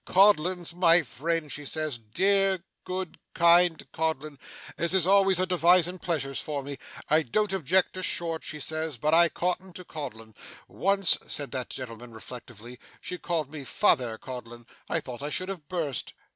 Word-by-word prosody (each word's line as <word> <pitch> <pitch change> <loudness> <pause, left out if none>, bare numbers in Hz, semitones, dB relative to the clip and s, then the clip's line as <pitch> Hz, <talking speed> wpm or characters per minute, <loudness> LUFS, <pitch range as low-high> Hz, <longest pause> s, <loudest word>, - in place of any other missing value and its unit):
"Codlin's 180 -3 +3
my 175 -1 +5
friend," 155 +3 -2
she 150 - -4
says, 155 -3 -3
"dear, 190 - +2 0.2
good, 185 -2 -5 0.2
kind 170 -1 +5
Codlin, 155 -3 -2 0.4
as 170 +3 +1
is 185 -3 +3
always 195 -1 +4
a 185 - +2
devising 180 0 +3
pleasures 140 -7 -2
for 145 -2 -4
me! 140 0 -7 0.3
I 155 +2 +4
don't 195 - 0
object 185 +1 +2
to 185 - -5
Short," 165 -3 0
she 150 - -5
says, 155 -1 -3
"but 150 +7 0
I 170 0 +6
cotton 180 +2 -2
to 180 +1 -9
Codlin." 115 -9 -8 0.3
Once,' 195 -2 +2
said 145 -2 -3
that 130 -2 -4
gentleman 120 -2 -7
reflectively, 120 0 -10 0.2
'she 180 - -6
called 160 -5 -2
me 155 -3 -6
Father 120 -3 +2
Codlin. 120 -1 -9 0.2
I 165 - 0
thought 125 -2 -8
I 145 - -3
should 185 +5 -1
have 175 -7 -6
bust! 160 - -2
160 Hz, 165 wpm, -27 LUFS, 135-180 Hz, 0.4 s, I